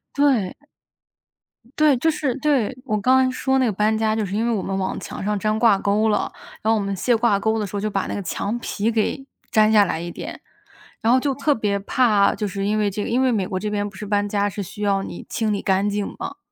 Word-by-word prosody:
对。 265 -10 +2 1.3
对 300 -3 +5
就 320 +6 +2
是 270 -5 -1
对， 270 -4 +1
我 215 -4 0
刚 255 +5 +4
刚 260 0 +3
说 265 +1 0
那 255 - +3
个 220 - +1
搬 215 +2 +1
家 220 0 +1
就 215 -2 -1
是 195 +2 -4
因 225 +2 0
为 - - +1
我 200 - -1
们 195 0 -3
往 190 0 -2
墙 - - -7
上 210 0 0
粘 215 +2 0
挂 225 -4 +5
钩 210 +3 +1
了， 210 - 0 0.3
然 220 - +2
后 220 - +1
我 - - -2
们 200 0 -2
卸 240 +6 +2
挂 220 -3 +2
钩 220 +1 0
的 210 - -1
时 205 - -8
候， - - -1
就 215 +1 -1
把 195 -2 -2
那 - - -3
个 200 - -3
墙 200 +5 -3
皮 225 -1 -1
给 230 +5 -1 0.3
粘 215 -1 +4
下 210 -2 +6
来 160 - -2
一 170 0 -5
点， - - -8 0.6
然 225 +1 +3
后 260 - +5
就 275 0 0
特 285 +1 +2
别 205 -2 -1
怕 205 -1 +3
就 210 - -2
是 195 +1 -3
因 210 +1 +1
为 205 -1 +2
这 205 +1 -4
个 - - -4
因 250 +3 +2
为 260 -1 +3
美 200 -4 0
国 185 -3 -3
这 210 - -3
边 205 0 -1
不 195 - -17
是 210 - -7
搬 205 0 0
家 205 0 0
是 205 - -5
需 205 +3 -10
要 195 -1 +1
你 - - -8
清 220 -2 -1
理 200 - -2
干 195 +1 +1
净 205 0 -2
嘛。 - - -5
210 Hz, 285 characters per minute, -22 LUFS, 200-235 Hz, 1.3 s, 下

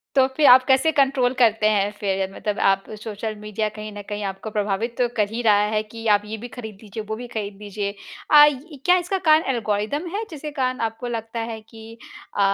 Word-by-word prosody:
तो 265 -1 +5
फिर 305 - +5
आप 255 0 +8
कैसे 265 +4 +4
कंट्रोल 270 -3 +2
करते 225 -3 +4
हैं 205 -1 +1
फिर 195 -1 -1
मतलब 210 -1 -3
आप 195 0 0 0.2
सोशल 215 0 -5
मीडिया 210 0 -2
कहीं 215 0 -7
न - - -6
कहीं 205 -1 -4
आपको 195 +3 -8
प्रभावित 210 +3 -2
तो 245 -1 +2
कर 210 -2 +2
ही 225 +3 -4
रहा 210 -2 +4
है 215 - +1
कि 225 +1 -10
आप 205 - -7
ये 215 +1 -5
भी 240 +3 -8
ख़रीद 220 -3 -9
लीजिए, 215 +1 -7
वो 220 +1 -5
भी 245 +2 -7
ख़रीद 205 -3 -5
लीजिए। 205 0 -3 0.4
अ, 295 -1 +9 0.4
क्या 360 0 +5
इसका 380 +2 -1
कार 310 +1 +6
एल्गोरिदम 220 - -2
है, 440 - -2
जिसके 305 -1 -6
कारण 255 0 0
आपको 225 +3 -9
लगता 230 0 -4
है 220 - -7
कि 225 +1 -13 0.4
अ, - - 0
220 Hz, 215 wpm, -23 LUFS, 210-250 Hz, 0.4 s, अ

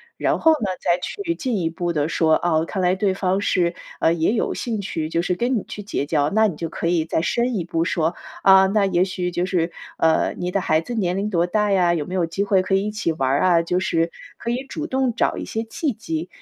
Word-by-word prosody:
应。 470 - -30
然 - - +1
后 320 - +5
呢， 295 -9 0 0.2
再 175 0 +2
去 340 - -3
进 255 -8 -2
一 165 -3 -1
步 170 +1 -3
地 150 0 +1
说， 160 0 +2
啊， 160 -2 +2
看 190 +1 -3
来 180 +1 +3
对 195 -1 0
方 190 0 0
是， 175 -3 +1 0.3
呃， 165 - +4
也 170 +5 +1
有 - - 0
兴 230 -3 -3
趣， 160 -4 -3
就 165 +1 0
是 180 - 0
跟 240 +6 0
你 205 - -2
去 205 - -8
结 195 - -2
交， 145 -1 +1
那 220 +5 +3
你 175 -7 -3
就 165 0 -4
可 170 - -3
以 165 -2 +1
再 160 - 0
深 240 +5 0
一 175 - -2
步 165 0 -1
说， 165 -1 0 0.3
啊， 190 0 +7
那 200 +1 +2
也 180 -2 +2
许 180 -1 -2
就 175 +1 -1
是 170 -3 0 0.2
呃， 160 0 +2
你 180 - -3
的 195 +1 0
孩 155 -2 +1
子 245 - -7
年 185 -5 0
龄 205 +2 -1
多 170 -2 +2
大 210 +2 +1
呀？ 175 -2 +3
有 155 - -2
没 180 - -7
有 180 -3 +1
机 195 +5 -2
会 195 -2 +3
可 190 +1 0
以 195 +2 +1
一 - - -1
起 210 -6 -1
玩 135 -4 -1
儿 140 - +2
啊？ 175 -2 +4
就 180 +2 0
是 165 -2 0 0.3
可 235 - -4
以 250 +2 -1
主 310 0 -4
动 260 -4 0
找 230 - 0
一 - - -5
些 225 +1 -3
契 275 +7 -2
机， 165 -5 -4
180 Hz, 285 characters per minute, -22 LUFS, 165-210 Hz, 0.3 s, 啊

